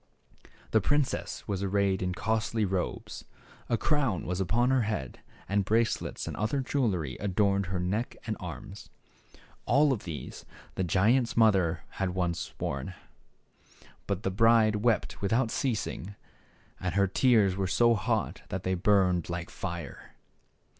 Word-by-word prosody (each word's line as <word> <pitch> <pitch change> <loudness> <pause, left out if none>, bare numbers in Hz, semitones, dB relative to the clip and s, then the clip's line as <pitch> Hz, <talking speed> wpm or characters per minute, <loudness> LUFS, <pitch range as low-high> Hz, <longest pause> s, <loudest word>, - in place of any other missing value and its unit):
The 110 - +4
princess 145 +5 -1
was 100 -2 -2
arrayed 100 -1 +1
in 90 0 -1
costly 110 +1 0
robes; 95 -1 -3 0.5
a 115 - +2
crown 135 - 0
was 90 +2 -2
upon 120 +7 +2
her 130 -1 +3
head, 105 - -3 0.3
and 100 +1 +1
bracelets 110 +4 0
and - - -4
other 110 +7 0
jewelry 100 - -1
adorned 100 -1 +1
her 95 0 -2
neck 100 +7 -2
and - - -2
arms. - - -8 0.8
All 145 0 +4
of 110 - -5
these 80 -4 -7 0.3
the 95 - -1
giant's 115 +8 +2
mother 95 -8 +3 0.2
had 95 -2 -1
once 85 -3 -2
worn. - - -3 1.1
But 100 0 -2
the 95 - 0
bride 110 +1 +4
wept 110 +1 0
without 115 +4 +1
ceasing, 105 -5 -2 0.6
and - - -3
her 100 0 +4
tears 100 -1 +3
were 95 -1 -1
so 120 +5 +4
hot 100 -7 -1
that 95 0 -4
they 95 - 0
burned 90 -3 +2
'like 85 0 -4
fire. 85 -2 -7
100 Hz, 140 wpm, -29 LUFS, 90-115 Hz, 1.1 s, The